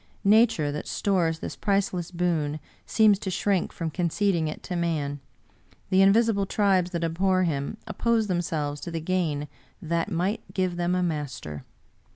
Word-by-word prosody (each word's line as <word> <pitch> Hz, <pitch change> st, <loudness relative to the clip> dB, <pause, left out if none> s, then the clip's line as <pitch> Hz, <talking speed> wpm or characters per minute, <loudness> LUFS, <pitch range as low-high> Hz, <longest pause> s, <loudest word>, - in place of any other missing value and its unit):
Nature, 205 Hz, -8 st, +4 dB
that 150 Hz, -, -5 dB
stores 175 Hz, -5 st, +1 dB
this -, -, -6 dB
priceless 190 Hz, -4 st, 0 dB
boon, 165 Hz, -4 st, -1 dB, 0.3 s
seems 215 Hz, -3 st, +4 dB
to 195 Hz, -, -4 dB
shrink 190 Hz, 0 st, 0 dB
from 165 Hz, -2 st, -4 dB
conceding 175 Hz, 0 st, 0 dB
it 155 Hz, -, -6 dB
to 180 Hz, -, -4 dB
man 155 Hz, -5 st, -1 dB, 0.3 s
— -, -, -33 dB
the 190 Hz, +1 st, +5 dB
invisible 200 Hz, 0 st, +4 dB
tribes 190 Hz, -4 st, +2 dB
that 170 Hz, -2 st, -3 dB
abhor 185 Hz, +3 st, +2 dB
him 150 Hz, +3 st, -2 dB
oppose 225 Hz, 0 st, +1 dB
themselves 160 Hz, -6 st, -2 dB
to -, -, -5 dB
the 165 Hz, -1 st, -3 dB
gain 160 Hz, -4 st, -1 dB, 0.3 s
that 170 Hz, 0 st, -1 dB
2^ight 190 Hz, +4 st, 0 dB, 0.2 s
give 185 Hz, -2 st, 0 dB
them 175 Hz, +1 st, 0 dB
a 180 Hz, -, +1 dB
master. 140 Hz, -, -4 dB
175 Hz, 160 wpm, -26 LUFS, 160-195 Hz, 0.3 s, the